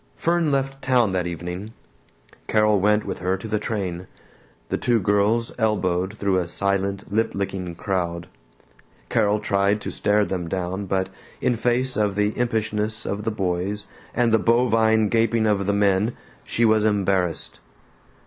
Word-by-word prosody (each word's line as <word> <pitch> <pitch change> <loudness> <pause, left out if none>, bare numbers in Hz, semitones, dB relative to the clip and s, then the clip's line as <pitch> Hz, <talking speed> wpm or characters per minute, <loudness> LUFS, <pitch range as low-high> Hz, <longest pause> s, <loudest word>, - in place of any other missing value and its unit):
Fern 170 -1 +1
left 135 0 -1
town 125 -6 +3
that 90 -1 -1
evening. 90 +5 -6 0.7
Carol 105 -1 +3
went 105 +2 +2
with - - -4
her 95 +1 0
to 95 - -8
the 105 -1 0
train. 95 -5 -3 0.6
The - - -1
two 120 -2 +2
girls 105 +4 +1
elbowed 100 -3 0
through 100 -2 +1
a 90 -2 0
silent 100 +2 -1
lip 110 +2 +1
licking 95 -3 -3
crowd. 85 -2 -2 0.8
Carol 105 -1 +2
tried 100 0 +1
to - - -4
stare 105 0 +2
them 90 -3 -3
down 95 +2 -3
but 95 0 0 0.3
in 125 - +1
face 125 +2 +1
of 105 -2 +1
the 105 +1 +1
impishness 110 -2 -1
of 100 +1 -3
the - - +2
boys 95 0 -2 0.3
and 120 -2 +2
the 110 - +4
bovine 115 -2 +3
gaping 115 +1 +2
of 100 -2 +1
the - - +3
men, 100 +2 +2 0.3
she 115 - +1
was 110 -1 +4
embarrassed. 95 -5 0
105 Hz, 155 wpm, -23 LUFS, 95-110 Hz, 0.8 s, the